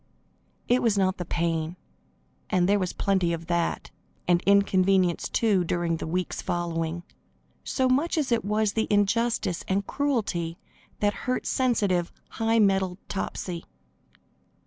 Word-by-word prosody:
It 245 +1 +3
was 220 -4 +2
not 190 -1 +2
the 180 - -4
pain 165 0 -1 0.7
and 180 -3 +2
there 205 +1 +3
was 185 -2 -1
plenty 190 -4 +1
of 165 0 -5
that, 170 0 -1 0.4
and 175 -1 +4
inconvenience, 190 -3 +3
too, 205 -6 +2
during 170 -1 -1
the - - -5
weeks 180 +2 -2
following 170 -1 -2 0.6
so 260 -1 0
much 285 +7 +1
as 285 -5 0
it 235 - +2
was 210 0 +1
the 220 - 0
injustice 205 -2 +1
and 195 +1 0
cruelty 200 - -1 0.4
that 205 0 +2 0.2
hurt 255 - 0
sensitive, 205 -9 +1 0.2
high 225 0 0
mettled 190 -4 +2
Topsy. 180 -3 -4
190 Hz, 135 wpm, -26 LUFS, 175-220 Hz, 0.7 s, and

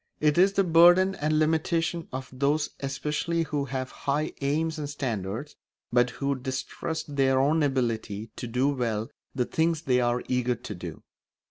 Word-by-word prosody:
It 150 +2 +3
is 195 +2 +5
the 195 - +3
burden 175 +2 +6
and 155 -2 0
limitation 160 +2 +1
of 130 0 -5
those 145 +3 +1
especially 150 +5 -1
who 145 -2 -2
have 130 -1 -4
high 145 +2 -1
aims 155 +3 0
and 145 -1 -4
standards, 120 -2 -4 0.4
but 125 0 +4
who 140 +2 -1
distrust 140 +4 -4
their 135 -1 +4
own 150 +4 +3
ability 115 -6 -1
to 120 - -4
do 125 +4 +1
well 115 -5 -2 0.2
the 125 -2 +1
things 160 +2 0
they 125 -4 +2
are 120 0 +1
eager 125 -1 +1
to 105 - -7
do. 85 -3 -8
140 Hz, 160 wpm, -27 LUFS, 125-160 Hz, 0.4 s, burden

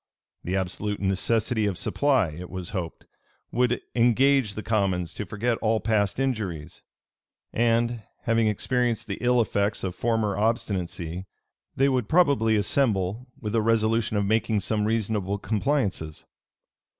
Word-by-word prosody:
The 90 - -2
absolute 95 +2 -2
necessity 105 +3 +1
of 95 -3 -2
supply, 135 - +2
it 85 +4 -8
was 90 -2 -5
hoped, 90 -5 -5 0.5
would 125 0 +1
engage 125 -1 +3
the 110 - -5
commons 95 -6 0
to 105 - -5
forget 115 +4 -1
all 110 0 +2
past 105 -1 0
injuries; 105 - -3 0.7
and, 115 0 +1 0.2
having 115 -3 +2
experienced 120 +2 0
the 100 - -5
ill 125 0 +3
effects 100 -2 0
of 95 -2 -2
former 110 0 0
obstinacy, 95 -5 -2 0.5
they 135 - +3
would 130 -5 0
probably 140 -10 +4
assemble 105 0 0
with 105 -4 -4
a 115 - +3
resolution 115 0 +1
of 100 - +1
making 110 0 +1
some 105 +2 0
reasonable 105 -3 0
compliances. 100 - -1
110 Hz, 135 wpm, -26 LUFS, 100-120 Hz, 0.7 s, probably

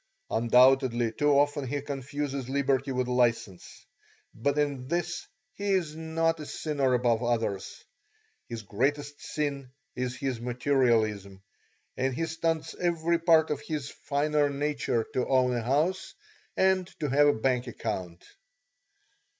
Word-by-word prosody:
Undoubtedly 120 0 +4
too 145 +6 +1
often 145 -1 +1
he 145 +3 -2
confuses 140 -1 -4
liberty 135 0 +1
with 125 -1 -1
license, 120 -7 -1 0.5
but 140 +6 -1
in 140 -3 -1
this 175 +3 -2 0.3
he 200 0 -1
is 170 -5 0
not 165 0 0
a 150 - -6
sinner 140 -5 0
above 120 -2 +2
others. 115 -5 -2 0.7
His 115 -2 -6
greatest 145 +8 -2
sin 140 -3 -3 0.3
is 125 0 -2
his 130 -5 -3
materialism, 115 -6 0 0.5
and 130 0 -1
he 165 - -1
stunts 165 0 -2
every 170 -1 +1
part 165 -2 +4
of 145 -1 -2
his 150 -3 -4
finer 145 0 0
nature 140 -5 -1
to 125 - 0
own 130 -2 +3
a 120 - -1
house 150 - 0 0.4
and 190 -1 +3
to 150 - -1
have 145 +2 +4
a 145 - +5
bank 125 +1 +1
account. 95 -7 -5
135 Hz, 135 wpm, -28 LUFS, 125-150 Hz, 0.7 s, a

